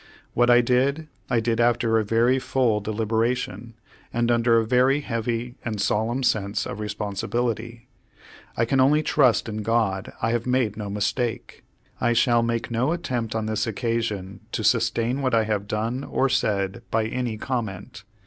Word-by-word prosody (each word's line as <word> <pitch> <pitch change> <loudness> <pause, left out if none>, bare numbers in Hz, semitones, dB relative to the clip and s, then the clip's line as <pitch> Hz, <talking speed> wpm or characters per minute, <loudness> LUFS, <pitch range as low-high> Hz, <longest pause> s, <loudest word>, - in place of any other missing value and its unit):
What 120 +1 +3
I 120 0 +7
did, 135 +6 +1 0.2
I 120 - +2
did 115 0 0
after 115 -1 +3
a - - 0
very 115 +5 +2
full 125 -5 +1
deliberation, 110 +1 -2 0.4
and 120 0 +1
under 115 0 +3
a 115 - +2
very 130 +4 +3
heavy 120 -1 -3
and 110 -3 -3
solemn 110 +6 0
sense 100 -4 0
of 105 - -6
responsibility. 115 +3 -3 0.7
I 115 - +2
can 135 +3 +1
only 145 +4 +4
trust 125 -6 +3
in 110 -1 -4
God 110 -3 0
I 115 - 0
have 120 +1 -1
made 125 -5 +1
no 105 -1 -5
mistake. 110 +3 -2 0.4
I 120 - +2
shall 120 0 +3
make 115 0 -2
no 125 +7 +1
attempt 120 -10 -3
on 110 -1 -1
this 110 0 -1
occasion 110 -4 -2
to - - -2
sustain 120 +4 +1
what 130 -3 +1
I 110 - +3
have 105 -2 -2
done 115 +5 -2
or 135 - 0
said 100 -6 0
by 110 -1 +1
any 120 -1 -3
comment. 110 -4 -4
115 Hz, 165 wpm, -24 LUFS, 110-125 Hz, 0.7 s, I